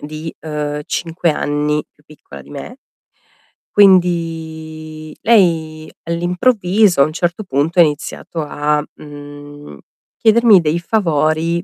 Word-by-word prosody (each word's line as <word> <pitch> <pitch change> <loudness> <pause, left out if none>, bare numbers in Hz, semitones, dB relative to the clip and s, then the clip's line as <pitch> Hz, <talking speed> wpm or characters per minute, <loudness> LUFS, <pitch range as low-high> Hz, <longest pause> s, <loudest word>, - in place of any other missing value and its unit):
di, 155 +2 -7
uhm, 150 -1 -4
5 170 0 -1
anni 150 0 -1
più 150 - -31
piccola 70 - -13
di 70 - -17
me. - - -8 1.0
Quindi, 160 -4 +1
lei 160 -8 +2
all'improvviso 180 - +2
a - - +6
un 155 - -4
certo 175 +4 -2
punto 165 +1 -1
ha - - +10
iniziato 155 +2 -3
a, 150 0 -1
mhmm, 145 0 -11 0.4
chiedermi 225 -3 +5
dei 160 +1 0
favori, 165 -3 0
160 Hz, 115 wpm, -17 LUFS, 150-175 Hz, 1.0 s, ha